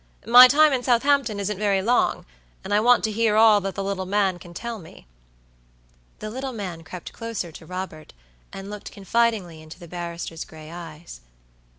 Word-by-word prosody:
"My 245 +3 +10
time 300 +3 +5
in 255 - 0
Southampton 245 -2 +2
isn't 200 0 -3
very 200 -2 +1
long, 240 +4 +1 0.4
and 200 - -4
I 205 - +4
want 245 +3 +4
to 220 - 0
hear 220 0 +1
all 215 -1 +6
that 195 0 -4
the 195 - -3
little 195 -1 -3
man 195 -2 +1
can 175 - -13
tell 230 +5 -6
me." 160 - -15 1.1
The 215 - -7
little 260 +2 -5
man 185 -7 -6
crept 180 +1 -9
closer 230 -7 -5
to 160 +1 -13
Robert, 180 -4 -7 0.4
and 195 +1 -8
looked 210 -1 -8
confidingly 200 -5 -1
into 155 +1 -12
the 175 -2 -12
barrister's 170 -1 -6
gray 155 0 -13
eyes. 165 - -10
200 Hz, 180 wpm, -23 LUFS, 175-230 Hz, 1.1 s, My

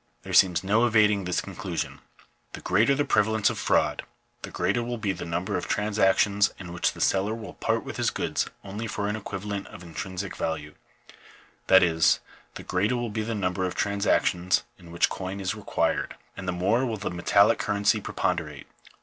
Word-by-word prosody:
There - - -7
seems 90 -2 +5
no 110 +5 +3
evading 105 -3 +3
this 90 -1 0
conclusion. - - -5 0.5
The - - -8
greater 110 +9 +3
the 145 +1 0
prevalence 110 0 +2
of - - -6
fraud, - - +1 0.4
the - - -7
greater 120 - 0
will 120 0 -3
be 105 -3 -1
the 90 - -6
number 90 +4 -2
of 90 - -4
trans 105 0 -1
actions 100 +1 +4
in 90 -3 -8
which 85 - 0
the - - -12
seller 100 +3 +2
will 115 -1 -8
part - - -1
with - - -7
his - - +2
goods - - -1 0.2
only 100 +3 -5
for 100 -2 -3
an 105 - -1
equivalent 100 -1 -5
of 90 - -11
intrinsic 90 +3 -5
value; 75 -2 -3 0.9
that 95 0 +7
is, 80 -2 +3 0.4
the - - -7
greater 105 +7 0
will 120 -2 -3
be 110 +1 -2
the 115 +1 -3
number 95 -2 -1
of 90 - -2
transactions 95 -3 +1 0.2
in 85 - -14
which 85 - +3
coin 95 +1 -5
is 95 0 -1
required, 90 -6 -1 0.2
and 95 - -7
the - - +1
more 100 +8 +1
will 115 -4 -2
the 100 - -4
metallic 85 -1 +3
currency 100 0 +1
preponderate. - - -2
100 Hz, 190 wpm, -26 LUFS, 90-110 Hz, 0.9 s, that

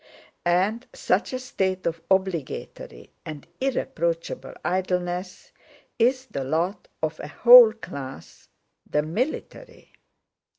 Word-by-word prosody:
And 195 +7 +1
such - - 0
a 255 - -2
state 190 -7 -2
of 170 -1 -2
obligatory 180 - -2
and 150 -3 -8
irreproachable 170 -11 -2
idleness 180 0 -2 0.5
is 255 +3 +2
the 140 - -5
lot 170 +8 -1 0.2
of 155 0 -2
a - - -6
whole 240 +6 +9
class—the 150 - -7
military. 300 - -5
185 Hz, 95 wpm, -25 LUFS, 165-235 Hz, 0.5 s, whole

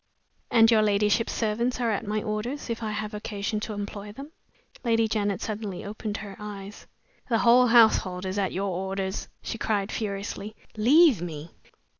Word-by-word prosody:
"And 225 0 +6
your 220 -1 +5
ladyship's 210 +2 +2
servants 235 +3 0
are 235 -2 +1
at 205 +1 -2
my 215 0 -1
orders, 235 +5 -3
if 230 - -4
I 220 - -2
have 215 0 -4
occasion 210 0 -3
to 215 +1 -5
employ 205 0 -6
them?" 275 +7 -10 0.5
Lady 225 -2 +2
Janet 205 -3 -1
suddenly 210 -4 -4
opened 210 +1 -4
her 200 -2 -8
eyes. 205 -1 -8 0.4
"The 230 - +3
whole 245 +2 +6
household 220 -6 +4
is 190 +2 -2
at 190 -2 0
your 195 +1 -2
orders," 190 +1 -3 0.2
she 225 - -5
cried, 205 -1 0
furiously. 205 0 -4 0.2
"Leave 260 - +5
me!" 160 -2 -6
210 Hz, 165 wpm, -26 LUFS, 200-225 Hz, 0.5 s, And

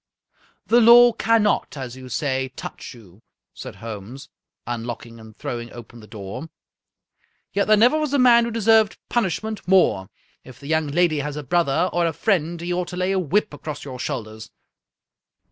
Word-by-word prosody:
" - - -36
The 240 - +7
law 240 +1 +8
cannot, 220 -9 +1
as 130 -2 -6
you 130 -1 -11
say, 130 +1 -1
touch - - -8
you," 105 -3 -18 0.3
said - - -9
Holmes, 115 +4 -9 0.4
unlocking 115 -1 -6
and 110 -1 -14
throwing 120 0 -6
open 120 0 -12
the 105 - -14
door, 105 +8 -8 0.5
" - - -46
yet 200 - 0
there 215 0 +5
never 245 +8 +4
was 305 -3 -2
a 285 - +2
man 240 -2 +5
who - - -3
deserved 225 -1 +3
punishment 220 -1 -2
more. 175 - +3 0.3
If 125 -2 -14
the - - -13
young 160 +1 0
lady 155 +1 +1
has 145 0 -4
a 150 - -5
brother 170 +2 +1
or 175 -1 +1
a 165 - -2
friend, 170 -1 0
he 175 +1 -3
ought 180 0 -2
to 180 - -7
lay 185 +1 0
a 195 - +1
whip 185 +1 0
across 145 0 -7
your 130 -3 -8
shoulders. 110 -1 -5
155 Hz, 180 wpm, -22 LUFS, -, 0.5 s, law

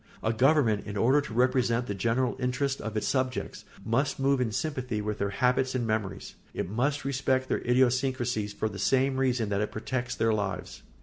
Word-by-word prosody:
A 110 - +1
government, 125 -4 +3
in 105 0 -4
order 130 +8 +4
to 140 - -8
represent 125 -1 +2
the 105 - -3
general 120 +5 0
interests 130 +2 -1
of 110 -1 -4
its 105 - -1
subjects, 130 -1 -2 0.2
must 135 +5 0
move 135 -1 +2
in 115 -3 0
sympathy 125 -2 -2
with 105 0 -3
their 100 - 0
habits 125 +4 +1
and 120 -2 0
memories; 105 -3 -3 0.2
it - - -2
must 135 +8 -1
respect 130 -1 0
their - - +1
idiosyncrasy 125 -2 +1
for 105 +1 -3
the 100 -2 -7
same 130 +5 +2
reason 125 -5 +1
that 100 0 0
it 105 - -2
protects 120 +2 -3
their 110 0 +2
lives. 100 -3 -3
125 Hz, 190 wpm, -28 LUFS, 110-130 Hz, 0.2 s, order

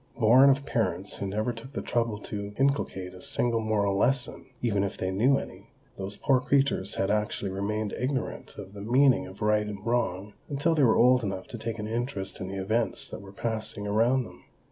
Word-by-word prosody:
Born 125 +4 +7
of 140 +1 +2
parents - - -1
who 100 - -3
never 110 +5 -1
took 120 +4 -11
the - - -3
trouble 115 -3 0
to 100 0 -6
inculcate 130 -9 0
a 90 - -12
single 115 +3 0
moral 105 -3 +1
lesson, 125 +5 0
even 100 -5 +1
if 100 - -3
they 95 - -2
knew 125 +9 +3
any, - - -8 0.3
those 100 +1 -6
poor 135 -2 +3
creatures 130 -7 +1
had 95 +1 0
actually 105 -2 -1
remained 105 +2 -2
ignorant 130 0 -3
of 95 - -9
the 100 - -8
meaning 125 0 +4
of 95 +2 -8
right 105 0 +2
and 105 0 -7
wrong 105 -4 -1 0.2
until 145 +4 +1
they 155 - +2
were 115 -4 +5
old 125 +1 +5
enough 95 -3 -3
to 120 - -6
take 115 0 -3
an 105 -1 -4
interest 115 -5 -3
in 95 - -3
the 95 +1 -5
events 110 +5 -1
that - - -7
were 100 -1 -11
passing 110 -1 -4
around 115 +5 +2
them. - - -13
110 Hz, 205 wpm, -28 LUFS, 100-125 Hz, 0.3 s, Born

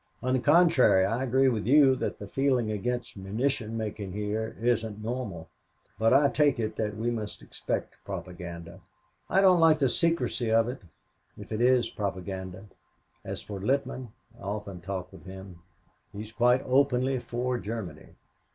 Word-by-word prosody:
On 130 +1 +1
the 130 - +3
contrary, 145 - +5
I 115 +6 -1
agree 135 +1 +3
with 115 -4 0
you 135 -1 +6
that - - -3
the 100 - -8
feeling 125 0 +1
against 120 +4 -3
munition 110 +3 -2
making 105 -3 -4
here 105 +2 -3
isn't 115 -3 0
normal, 110 -9 -4 0.5
but 115 0 +3
I 140 +2 +6
take 145 -4 +2
it 110 -1 -2
that 105 -1 -2
we 115 +2 -1
must 110 -3 -5
expect - - -4
propaganda. 85 0 -7 0.5
I 195 - +4
don't 185 -2 +6
like 160 -1 +6
the 135 -4 +2
secrecy 165 -8 0
of 115 0 +4
it, 125 +2 -5 0.6
if - - -11
it 110 +1 -2
is 125 -2 +3
propaganda. 95 -1 -5 0.6
As - - -5
for 100 -2 -7
Littman, 130 +3 -1 0.3
I - - -16
often 100 -2 -5
talk 95 0 -5
with - - -14
him. 95 -2 -10 0.5
He's 105 +2 -8
quite 125 +3 +3
openly 130 0 +2
for 125 +1 -2
Germany. 100 -9 -7
115 Hz, 160 wpm, -28 LUFS, 100-130 Hz, 0.6 s, you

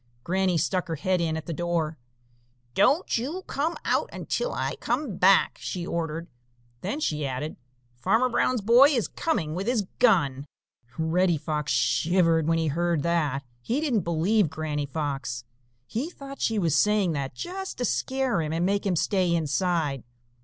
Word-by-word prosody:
Granny 185 0 +1
stuck 180 +3 0
her 165 - -2
head 180 +4 0
in 160 -1 0
at 160 - -6
the 165 - -4
door. 165 -1 -1 0.8
"Don't 270 - +3
you 315 +10 -4
come 310 +3 -2
out - - +1
until - - -2
I - - -2
come 240 - -2
back," 190 +1 +4
she 175 -2 -4
ordered. 165 -1 -3 0.5
Then 205 +11 -3
she 150 - -1
added: 135 +3 -3 0.4
"Farmer 225 - +2
Brown's 250 -1 +1
boy 240 +7 +7
is 245 -8 +1
coming 185 - -1
with 190 +5 -3
his 240 -4 +2 0.2
gun." 150 - +3 0.5
Reddy 170 +2 +2
Fox 150 -1 -2
shivered 165 +6 +2
when 165 0 +3
he 165 - 0
heard 170 0 0
that. 150 -5 0 0.2
He 240 - -1
didn't 280 -8 +1
believe 170 +3 +2
Granny 150 -2 -3
Fox. 135 -5 -3 0.4
He 250 - -3
thought 275 -5 -10
she 225 - +1
was 165 -6 +2
saying 210 -1 +3
that 140 -3 -3
just 380 +2 -5
to 245 - -1
scare 260 -4 0
him 155 -1 -3
and 170 +2 0
make 200 +1 0
him 185 - +1
stay 185 +1 +1
inside. 160 -3 0
175 Hz, 165 wpm, -26 LUFS, 155-225 Hz, 0.8 s, boy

